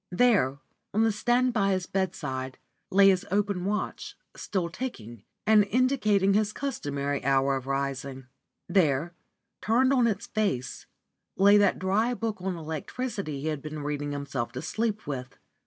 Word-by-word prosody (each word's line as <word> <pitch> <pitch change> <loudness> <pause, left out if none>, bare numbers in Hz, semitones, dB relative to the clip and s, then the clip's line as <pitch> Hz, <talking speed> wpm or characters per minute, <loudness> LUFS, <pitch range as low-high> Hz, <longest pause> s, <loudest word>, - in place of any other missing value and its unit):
There, 180 - +3 0.4
on 220 - +4
the 225 - +3
stand 240 +4 +1
by 200 -3 +2
his 185 -1 -1
bedside, 140 -10 -3 0.3
lay 195 +1 +6
his 185 -2 +2
open 200 -2 0
watch, 210 +2 -3 0.2
still 185 -4 -2
ticking, 120 - -7 0.2
and 215 -1 +6
indicating 215 -5 +2
his 215 +1 +1
customary 145 - -3
hour 135 +1 +2
of 135 0 -5
rising. 135 -1 -3 0.4
There, 165 -3 +2 0.5
turned 255 +4 +3
on 250 -3 +4
its 220 +1 -2
face, 195 - -2 0.5
lay 200 +2 +6
that 205 -2 +3
dry 215 +6 +1
book 225 -4 -3
on 185 0 -2
electricity 160 - -4
he 155 - -3
had 150 -3 -3
been 155 0 -6
reading 145 0 -3
himself 140 -4 -3
to 130 - -5
sleep 220 -1 -2
with. 130 -3 -6
190 Hz, 150 wpm, -27 LUFS, 140-215 Hz, 0.5 s, lay